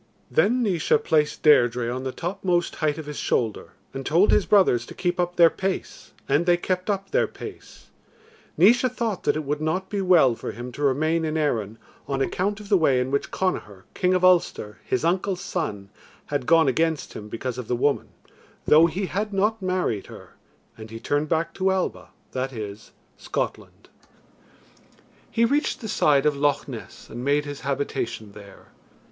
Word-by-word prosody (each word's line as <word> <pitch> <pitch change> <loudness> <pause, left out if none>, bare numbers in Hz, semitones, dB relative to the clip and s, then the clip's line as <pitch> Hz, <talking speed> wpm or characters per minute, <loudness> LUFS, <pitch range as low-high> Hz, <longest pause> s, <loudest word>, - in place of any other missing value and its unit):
Then 215 - +3
Naois 180 -8 +2
placed 150 -2 +1
Deirdre 120 -5 +4
on 130 +1 -4
the 130 - -3
topmost 175 +1 -2
height 150 -1 0
of 160 - -6
his 150 0 -6
shoulder, 110 -4 -1 0.2
and 135 0 -5
told 170 +9 +3
his 210 - +3
brothers 185 - +4
to - - -10
keep 180 0 -1
up 175 0 0
their 170 -2 +6
pace, 190 0 -4 0.2
and 150 +6 +1
they 175 0 +5
kept 185 +2 -2
up 195 -1 -2
their - - +2
pace. - - -11 0.7
Naois 235 +9 +5
thought 225 -5 -3
that - - +2
it 155 - -2
would 145 +1 -3
not 175 +5 -2
be 200 -2 -1
well 175 -9 +5
for - - -6
him 120 +1 -7
to 140 - -9
remain 155 +4 +1
in 160 0 -1
Erin 115 -8 -1 0.3
on 135 -1 -2
account 195 +9 -1
of 210 - -11
the 200 -2 +3
way 135 -5 +3
in 125 +1 -2
which 140 - -1
Connachar, 105 - -3
King 185 0 +1
of 185 0 +2
Ulster, 165 -12 +2
his 130 - -1
uncle's 185 +2 0
son, 105 - -4 0.3
had 140 -4 -3
gone 165 -2 +5
against 160 0 0
him 105 0 -8
because 125 +3 -4
of 120 - -6
the 125 - 0
woman, 140 +4 0 0.6
though 160 +2 +6
he 185 +4 -3
had 205 +3 -3
not 210 +2 0
married 185 - -1
her; - - -12 0.5
and 110 0 -9
he 115 +1 -8
turned 145 +5 -1
back 165 0 0
to 190 0 0
Alba, 190 -1 -2 0.2
that 130 +1 -3
is, 105 -3 -8 0.3
Scotland. - - -5 1.4
He 230 - +2
reached 285 +5 0
the 225 - -6
side 150 -8 +3
of 150 -1 +3
Loch 145 +1 0
Ness - - -9
and 120 +2 -7
made 145 +2 +1
his 145 -1 -6
habitation 135 -6 -3
there. 100 -1 -14
155 Hz, 185 wpm, -24 LUFS, 130-185 Hz, 1.4 s, their